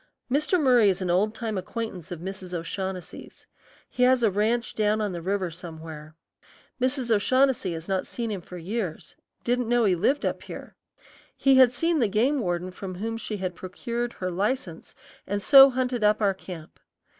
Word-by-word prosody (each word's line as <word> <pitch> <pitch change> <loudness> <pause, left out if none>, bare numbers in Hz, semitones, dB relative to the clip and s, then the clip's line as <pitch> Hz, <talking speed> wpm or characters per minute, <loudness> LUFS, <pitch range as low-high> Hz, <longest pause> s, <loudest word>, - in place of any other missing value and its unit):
Mr. 305 +6 +2
Murry 250 -7 +5
is 190 -1 0
an 180 - 0
old 210 +5 +1
time 220 -4 -3
acquaintance 185 -3 -6
of 170 -2 -6
Mrs. 185 -1 -6
O'Shaughnessy's. 185 +1 -6 0.4
He - - -5
has 250 -1 +4
a 220 - +4
ranch 225 +5 0
down 215 0 +1
on 210 -2 -1
the 175 -2 -5
river 190 0 -1
somewhere. 160 -2 -9 0.7
Mrs. 255 -2 0
O'Shaughnessy 245 -2 +2
has 165 0 -7
not 190 -1 -1
seen 230 -2 -4
him 195 -3 -4
for 180 +1 -10
years, 185 0 -4 0.3
didn't 245 -1 0
know 240 0 +3
he 195 - +4
lived 215 - +1
up - - -2
here. - - -10 0.6
He 270 -1 +4
had 255 -2 +7
seen 330 +5 +1
the 235 - +3
game 240 +8 +1
warden 180 -3 -2
from 185 0 -7
whom 225 +5 -3
she 225 -2 -4
had 185 -2 -3
procured 235 +7 -4
her 185 -1 -4
license, 195 -2 -3 0.3
and 205 +1 -1
so 270 +6 +9
hunted 250 -3 -1
up 210 0 +4
our 200 -3 +2
camp. 180 -4 -10
210 Hz, 180 wpm, -26 LUFS, 180-240 Hz, 0.7 s, so